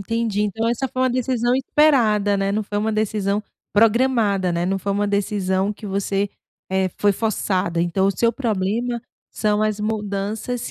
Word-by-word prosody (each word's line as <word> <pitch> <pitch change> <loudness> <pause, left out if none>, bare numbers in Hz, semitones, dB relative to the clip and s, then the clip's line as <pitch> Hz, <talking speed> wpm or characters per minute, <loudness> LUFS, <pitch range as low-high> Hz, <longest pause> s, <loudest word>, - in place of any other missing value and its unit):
entendi, 225 0 -1
então 225 +2 -1
essa 240 +3 -1
foi 255 +1 -4
uma 260 - +3
decisão 245 -1 +1
esperada, 240 -7 +3
né, 195 0 0
não 210 +2 0
foi 205 0 -5
uma 215 +2 0
decisão 210 -1 0 0.3
programada, 220 -4 +3
né, 170 0 -1
não 195 +1 0
foi 200 - -2
uma 205 +1 +1
decisão 200 -1 0
que 210 +1 -10
você, 200 0 -1 0.4
eh, 190 0 +1
foi 205 0 +3
forçada, 185 -5 -1
então 175 +3 +1
o - - +3
seu 230 +5 +1
problema 235 +1 -1 0.3
são 210 -1 0
as 215 -1 0
mudanças 210 +2 -3
210 Hz, 170 wpm, -21 LUFS, 195-230 Hz, 0.4 s, uma